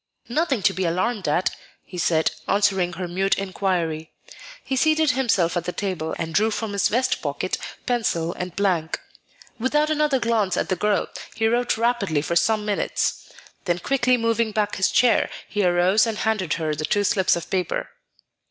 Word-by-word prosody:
"Nothing 270 Hz, -, 0 dB
to 195 Hz, -, +4 dB
be 190 Hz, -, -2 dB
alarmed 185 Hz, +4 st, -1 dB
at," 165 Hz, +5 st, +1 dB, 0.3 s
he 180 Hz, -, -8 dB
said, 160 Hz, -2 st, +2 dB, 0.2 s
answering 190 Hz, -3 st, +2 dB
her 180 Hz, +1 st, -4 dB
mute 190 Hz, +3 st, +1 dB
inquiry. 180 Hz, -5 st, -2 dB, 0.5 s
He 265 Hz, -, -2 dB
seated 310 Hz, +2 st, +3 dB
himself 205 Hz, -10 st, +1 dB
at 175 Hz, -1 st, -1 dB
the 180 Hz, -, -2 dB
table, 180 Hz, -5 st, -3 dB
and 165 Hz, -1 st, -4 dB
drew 215 Hz, +6 st, +3 dB
from 220 Hz, -1 st, -3 dB
his 200 Hz, -, +2 dB
vest 250 Hz, +4 st, 0 dB
pocket -, -, -2 dB, 0.3 s
pencil 175 Hz, -9 st, 0 dB
and 180 Hz, -1 st, -6 dB
blank. 180 Hz, -6 st, 0 dB, 0.6 s
Without 295 Hz, +5 st, +1 dB
another 300 Hz, -3 st, +2 dB
glance 225 Hz, -6 st, +1 dB
at -, -, -1 dB
the 185 Hz, -, +1 dB
girl, 210 Hz, +2 st, +1 dB, 0.3 s
he 225 Hz, -, +1 dB
wrote 240 Hz, +1 st, +1 dB
rapidly 220 Hz, -10 st, +1 dB
for 170 Hz, +3 st, -2 dB
some 215 Hz, +4 st, +2 dB
minutes; 205 Hz, -1 st, -1 dB, 0.3 s
then 175 Hz, -2 st, +1 dB
quickly 255 Hz, +5 st, +2 dB
moving 230 Hz, -1 st, +1 dB
back 210 Hz, -1 st, -1 dB
his 190 Hz, +1 st, +2 dB
chair, 235 Hz, +3 st, +3 dB, 0.2 s
he 205 Hz, -, -1 dB
arose 180 Hz, +5 st, +3 dB
and 220 Hz, -2 st, -2 dB
handed 215 Hz, -8 st, 0 dB
her 155 Hz, -2 st, -1 dB
the 150 Hz, +1 st, -4 dB
two 205 Hz, +6 st, +1 dB
slips 190 Hz, -1 st, +3 dB
of 170 Hz, -1 st, -6 dB
paper. 185 Hz, -2 st, -1 dB
200 Hz, 175 wpm, -23 LUFS, 175-230 Hz, 0.6 s, to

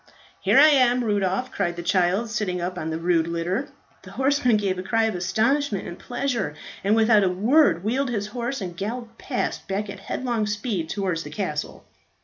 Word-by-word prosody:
"Here -, -, +3 dB
I 300 Hz, +3 st, +9 dB
am, 250 Hz, -3 st, +4 dB
Rudolph," 205 Hz, +2 st, 0 dB
cried 175 Hz, -3 st, -1 dB
the 175 Hz, -, -6 dB
child, 185 Hz, +5 st, +2 dB
sitting 200 Hz, -5 st, -1 dB
up 180 Hz, +1 st, -3 dB
on 160 Hz, -3 st, -4 dB
the 160 Hz, -, -2 dB
rude 165 Hz, -1 st, +1 dB
litter. 175 Hz, +10 st, -2 dB, 0.3 s
The -, -, -13 dB
horseman 265 Hz, -4 st, +2 dB
gave 195 Hz, -3 st, -1 dB
a -, -, -2 dB
cry 225 Hz, +4 st, +1 dB
of 220 Hz, -1 st, +1 dB
astonishment 220 Hz, +6 st, 0 dB
and 175 Hz, -, -8 dB
pleasure, 245 Hz, -, -2 dB, 0.3 s
and 205 Hz, +3 st, +3 dB
without 220 Hz, -2 st, +5 dB
a 190 Hz, -, +3 dB
word 195 Hz, -, +3 dB
wheeled 255 Hz, +5 st, 0 dB
his 210 Hz, -4 st, -2 dB
horse 245 Hz, +1 st, -3 dB
and 180 Hz, -2 st, -5 dB
galloped 230 Hz, +4 st, -5 dB
past 255 Hz, -, -3 dB
back 200 Hz, +1 st, -2 dB
at 200 Hz, -, -9 dB
headlong 230 Hz, +1 st, -2 dB
speed 205 Hz, -5 st, -2 dB
towards 185 Hz, -4 st, -1 dB
the 150 Hz, -, -8 dB
castle. 150 Hz, -3 st, -4 dB
205 Hz, 190 wpm, -24 LUFS, 180-240 Hz, 0.3 s, I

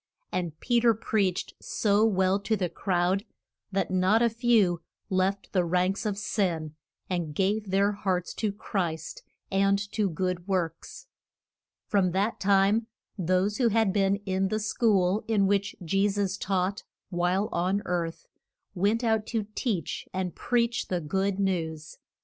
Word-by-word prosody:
And 170 Hz, -4 st, -3 dB
Pe 240 Hz, -1 st, +2 dB
ter 230 Hz, -1 st, +4 dB
preached 200 Hz, -4 st, -1 dB
so 210 Hz, 0 st, +2 dB
well 190 Hz, -1 st, +2 dB
to 200 Hz, +2 st, 0 dB
the 180 Hz, -3 st, -1 dB
crowd 180 Hz, +2 st, 0 dB, 0.5 s
that 195 Hz, -1 st, -1 dB
not 190 Hz, +5 st, +3 dB
a 235 Hz, -, +3 dB
few 220 Hz, -7 st, +3 dB, 0.3 s
left 190 Hz, +1 st, 0 dB
the 185 Hz, -3 st, +3 dB
ranks 180 Hz, +4 st, 0 dB
of 200 Hz, -2 st, -2 dB
sin 175 Hz, -7 st, -1 dB, 0.3 s
and 170 Hz, -5 st, -3 dB
gave 200 Hz, +3 st, 0 dB
their 200 Hz, +2 st, +3 dB
hearts 185 Hz, -3 st, -2 dB
to 215 Hz, -2 st, -1 dB
Christ, 175 Hz, -6 st, -3 dB, 0.3 s
and 195 Hz, +1 st, +3 dB
to 210 Hz, -3 st, +1 dB
good 180 Hz, +1 st, -2 dB
works. 175 Hz, -4 st, -3 dB, 0.8 s
From 185 Hz, -4 st, +1 dB
that 200 Hz, +4 st, 0 dB
time 200 Hz, +3 st, +3 dB, 0.3 s
those 185 Hz, +2 st, +1 dB
who 245 Hz, -, +3 dB
had 220 Hz, -3 st, +2 dB
been 195 Hz, -1 st, +3 dB
in 190 Hz, 0 st, +1 dB
the 215 Hz, +3 st, -1 dB
school 210 Hz, -3 st, +2 dB
in 210 Hz, -3 st, +3 dB
which 200 Hz, 0 st, +1 dB
Je 195 Hz, +5 st, +2 dB
sus 200 Hz, -1 st, -1 dB
taught 195 Hz, +2 st, -1 dB, 0.3 s
while 180 Hz, +3 st, +1 dB
on 185 Hz, +4 st, 0 dB
earth 170 Hz, -2 st, -2 dB, 0.5 s
went 205 Hz, +5 st, +1 dB
out 220 Hz, -2 st, +1 dB
to 225 Hz, -3 st, -1 dB
teach 205 Hz, -, -2 dB
and 185 Hz, -2 st, -2 dB
preach 235 Hz, -1 st, 0 dB
the 180 Hz, -, -1 dB
good 190 Hz, +5 st, -1 dB
news. 160 Hz, -5 st, -2 dB
195 Hz, 150 wpm, -27 LUFS, 180-210 Hz, 0.8 s, ter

